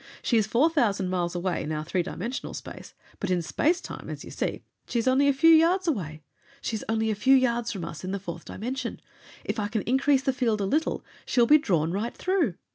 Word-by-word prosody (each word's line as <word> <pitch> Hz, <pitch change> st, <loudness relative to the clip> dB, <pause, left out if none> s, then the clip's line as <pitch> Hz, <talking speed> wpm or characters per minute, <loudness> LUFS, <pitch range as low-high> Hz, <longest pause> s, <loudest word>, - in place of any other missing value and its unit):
She 240 Hz, -, +1 dB
is 215 Hz, -2 st, +2 dB
four 245 Hz, +8 st, +4 dB
thousand 205 Hz, -, +1 dB
miles 175 Hz, -1 st, -1 dB
away 175 Hz, 0 st, -1 dB
in 155 Hz, -, -4 dB
our 155 Hz, 0 st, -3 dB
three 180 Hz, +3 st, 0 dB
dimensional 230 Hz, +9 st, -5 dB
space, -, -, -9 dB, 0.2 s
but 200 Hz, -, -3 dB
in 180 Hz, -2 st, +1 dB
space 335 Hz, -, +1 dB
time, -, -, -8 dB
as -, -, -6 dB
you -, -, -10 dB
see, -, -, -3 dB, 0.2 s
she -, -, -2 dB
is 230 Hz, -, 0 dB
only 265 Hz, +2 st, +4 dB
a -, -, +6 dB
few 280 Hz, +5 st, +5 dB
yards 340 Hz, +3 st, +4 dB
away. 155 Hz, -, -2 dB, 0.4 s
She 230 Hz, -, -3 dB
is 215 Hz, -, -4 dB
only 220 Hz, 0 st, +1 dB
a -, -, +1 dB
few 260 Hz, +6 st, +5 dB
yards 240 Hz, -2 st, +1 dB
from 190 Hz, -6 st, -5 dB
us 165 Hz, 0 st, -8 dB
in 185 Hz, -, -4 dB
the 200 Hz, -, -1 dB
fourth 170 Hz, -3 st, -7 dB
dimension. 250 Hz, +3 st, -4 dB, 0.5 s
If -, -, -2 dB
I 205 Hz, -, 0 dB
can 215 Hz, 0 st, -2 dB
increase 265 Hz, +2 st, +2 dB
the 270 Hz, -, +1 dB
field 230 Hz, -5 st, 0 dB
a 200 Hz, -, 0 dB
little, 305 Hz, +11 st, 0 dB, 0.2 s
she 255 Hz, -, +1 dB
will 240 Hz, -, +7 dB
be 300 Hz, +5 st, +6 dB
drawn 170 Hz, -, +1 dB
right 210 Hz, +6 st, -3 dB
through!" 360 Hz, -, +1 dB
225 Hz, 240 wpm, -26 LUFS, 185-270 Hz, 0.5 s, will